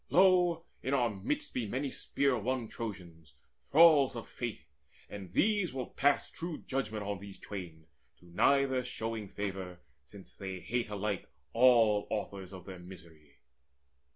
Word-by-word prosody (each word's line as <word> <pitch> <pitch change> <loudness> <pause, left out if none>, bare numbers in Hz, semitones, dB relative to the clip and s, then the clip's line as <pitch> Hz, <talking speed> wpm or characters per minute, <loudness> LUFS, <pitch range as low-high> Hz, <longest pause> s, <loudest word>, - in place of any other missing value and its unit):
Lo, 180 -2 +4 0.2
in 135 +2 0
our 120 -4 +2
midst 95 -1 -3
Be 120 -4 -2
many 130 +5 -2
spear 140 -2 +1
won 120 +1 -1
Trojans, 85 -11 -8 0.2
thralls 145 - +6
of 115 - -6
Fate; 120 -3 -5 0.4
And 100 -4 -8
these 200 - +2
will 130 -2 -4
pass 145 +1 +2
true 165 -1 -5
judgment 110 -6 -2
on 100 -1 -3
these 100 0 -10
twain, 85 -6 -8 0.3
To - - -21
neither 130 +9 +3
showing 115 -3 -4
favour, 95 -3 -5 0.2
since 95 +7 -14
they 95 -2 -6
hate 115 +6 -2
Alike 105 -2 -3 0.2
all 115 -4 +5
authors 100 -3 -4
of 95 -2 -10
their 95 -2 -8
misery." 85 -5 -14
105 Hz, 145 wpm, -32 LUFS, 95-130 Hz, 0.4 s, thralls